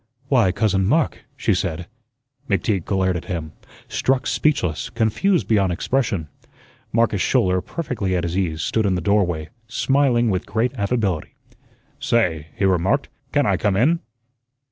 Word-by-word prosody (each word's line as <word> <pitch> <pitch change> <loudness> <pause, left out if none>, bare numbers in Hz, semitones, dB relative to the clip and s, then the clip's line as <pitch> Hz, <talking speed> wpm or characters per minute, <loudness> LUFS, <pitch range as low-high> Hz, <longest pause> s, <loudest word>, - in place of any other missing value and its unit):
"Why, 120 -9 +4
Cousin 100 0 +1
Mark!" 150 +8 +1
she - - +1
said. 80 +2 -2 0.6
McTeague 95 -2 0
glared 95 -2 +1
at 85 - -4
him, 80 -4 -4 0.4
struck 130 -1 0
speechless, 120 - 0
confused 170 - +1
beyond 100 -4 +2
expression. 100 - -1 0.6
Marcus 115 -4 +2
Schouler, 90 +2 +2
perfectly 120 - -3
at 90 - 0
his 85 0 -2
ease, 80 -5 -1
stood 110 -2 +1
in 95 - +1
the 90 - -1
doorway, 90 -5 +1 0.2
smiling 125 -2 +2
with 90 -1 -2
great 115 +4 0
affability. 100 - -1 0.6
"Say," 85 -10 +1
he 95 - 0
remarked, 95 +9 +1 0.2
"can 145 -1 +2
I 100 -4 +2
come 100 0 +1
in?" 155 +10 +3
100 Hz, 145 wpm, -22 LUFS, 90-120 Hz, 0.6 s, Why